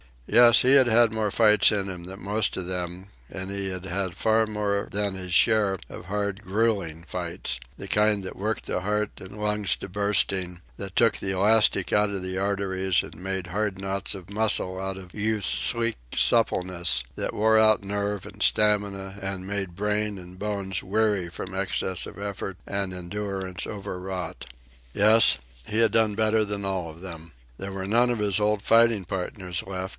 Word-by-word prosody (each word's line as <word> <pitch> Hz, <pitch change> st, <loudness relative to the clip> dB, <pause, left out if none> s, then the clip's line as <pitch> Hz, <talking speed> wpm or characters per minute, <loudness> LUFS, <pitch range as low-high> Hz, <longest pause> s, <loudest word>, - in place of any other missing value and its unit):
Yes, 120 Hz, -, +6 dB
he 130 Hz, +2 st, +5 dB
had 130 Hz, -3 st, +6 dB
had 115 Hz, 0 st, +4 dB
more 110 Hz, -1 st, -1 dB
fights 105 Hz, 0 st, +4 dB
in 100 Hz, -2 st, -2 dB
him 90 Hz, -2 st, -7 dB
than 95 Hz, +1 st, -9 dB
most 105 Hz, +2 st, 0 dB
of 95 Hz, -, -4 dB
them, 90 Hz, +1 st, -5 dB, 0.2 s
and 95 Hz, 0 st, -5 dB
he 100 Hz, -1 st, -3 dB
had 90 Hz, 0 st, -5 dB
had 95 Hz, -1 st, -2 dB
far 110 Hz, 0 st, +2 dB
more 105 Hz, -1 st, -2 dB
than 100 Hz, -1 st, -1 dB
his 90 Hz, -1 st, -5 dB
share 105 Hz, -1 st, +4 dB
of 95 Hz, -, -7 dB
the -, -, -9 dB
hard, 100 Hz, +1 st, -3 dB
gruelling 95 Hz, -5 st, -1 dB
fights 75 Hz, -5 st, -4 dB, 0.2 s
the 100 Hz, -, -8 dB
kind 105 Hz, 0 st, +2 dB
that 95 Hz, -, -7 dB
worked 105 Hz, +2 st, -3 dB
the -, -, -2 dB
heart 105 Hz, +2 st, -1 dB
and 95 Hz, +3 st, -11 dB
lungs 105 Hz, -1 st, 0 dB
to -, -, -9 dB
bursting, 95 Hz, -2 st, 0 dB, 0.2 s
that 95 Hz, -2 st, -5 dB
took 115 Hz, -2 st, +3 dB
the 95 Hz, -, -3 dB
elastic 105 Hz, +4 st, +3 dB
out 105 Hz, 0 st, +2 dB
of 95 Hz, -2 st, -4 dB
the 95 Hz, 0 st, -3 dB
arteries 95 Hz, -2 st, 0 dB
and -, -, -11 dB
made 95 Hz, 0 st, -4 dB
hard 100 Hz, +1 st, -2 dB
knots 95 Hz, +1 st, -3 dB
of 95 Hz, -1 st, -11 dB
muscle 100 Hz, -3 st, +1 dB
out 95 Hz, 0 st, -4 dB
of 90 Hz, -2 st, -12 dB
Youth's 105 Hz, -1 st, -1 dB
sleek 115 Hz, -, +2 dB, 0.2 s
suppleness, 90 Hz, -1 st, +2 dB
that -, -, -3 dB
wore 110 Hz, +1 st, +3 dB
out 110 Hz, -1 st, +4 dB
nerve 100 Hz, 0 st, -3 dB
and -, -, -12 dB
stamina 100 Hz, -2 st, +1 dB
and 95 Hz, -1 st, -3 dB
made 95 Hz, -3 st, -3 dB
brain 105 Hz, +1 st, -1 dB
and 90 Hz, 0 st, -12 dB
bones 100 Hz, -3 st, -3 dB
weary 105 Hz, -2 st, 0 dB
from 90 Hz, +2 st, -7 dB
excess 95 Hz, -1 st, -2 dB
of -, -, -11 dB
effort 100 Hz, -2 st, -5 dB
and 100 Hz, -2 st, -2 dB
endurance 95 Hz, 0 st, -5 dB
overwrought. 95 Hz, -2 st, -6 dB, 0.5 s
Yes, 105 Hz, -, +6 dB, 0.3 s
he 110 Hz, -, -1 dB
had 115 Hz, -1 st, +4 dB
done 110 Hz, -2 st, +3 dB
better 110 Hz, 0 st, +2 dB
than 100 Hz, -1 st, -4 dB
all 95 Hz, -4 st, -2 dB
of 80 Hz, +2 st, -12 dB
them. 85 Hz, -3 st, -9 dB, 0.2 s
There 95 Hz, 0 st, -6 dB
were 95 Hz, -1 st, -4 dB
none 120 Hz, +5 st, +3 dB
of 120 Hz, -2 st, -1 dB
his 105 Hz, -1 st, +1 dB
old 105 Hz, -1 st, +1 dB
fighting 115 Hz, -3 st, +4 dB
partners 90 Hz, 0 st, -4 dB
left. 95 Hz, 0 st, -4 dB
100 Hz, 185 wpm, -25 LUFS, 95-105 Hz, 0.5 s, Yes